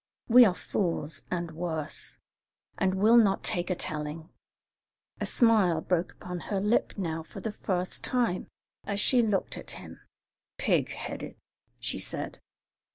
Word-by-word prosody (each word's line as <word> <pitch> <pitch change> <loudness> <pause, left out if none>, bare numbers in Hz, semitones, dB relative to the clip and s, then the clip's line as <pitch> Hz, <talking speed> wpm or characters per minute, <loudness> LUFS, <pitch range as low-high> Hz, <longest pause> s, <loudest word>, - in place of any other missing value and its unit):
'We 245 +1 +9
are 185 -4 +2
fools 165 -6 -2
and 175 -2 -2
worse, 160 -2 -3 0.6
and 190 -1 +2
will 215 +5 +6
not 205 -4 +4
take 175 +1 -1
a 185 - +1
telling.'" 155 +1 -4 0.9
A - - -1
smile 215 - +4
broke 175 +1 0
upon 180 -1 -6
her 200 - +1
lip 210 +4 +2
now 165 -4 -2
for 160 - -10
the 220 - -3
first 185 -3 -2
time 240 -8 0 0.4
as 200 -1 -2
she 245 +3 +4
looked 210 -4 0
at - - -9
him. - - -11 0.6
"'Pig - - +2
headed!'" - - -6 0.4
she - - -2
said. - - -4
185 Hz, 145 wpm, -29 LUFS, 165-210 Hz, 0.9 s, We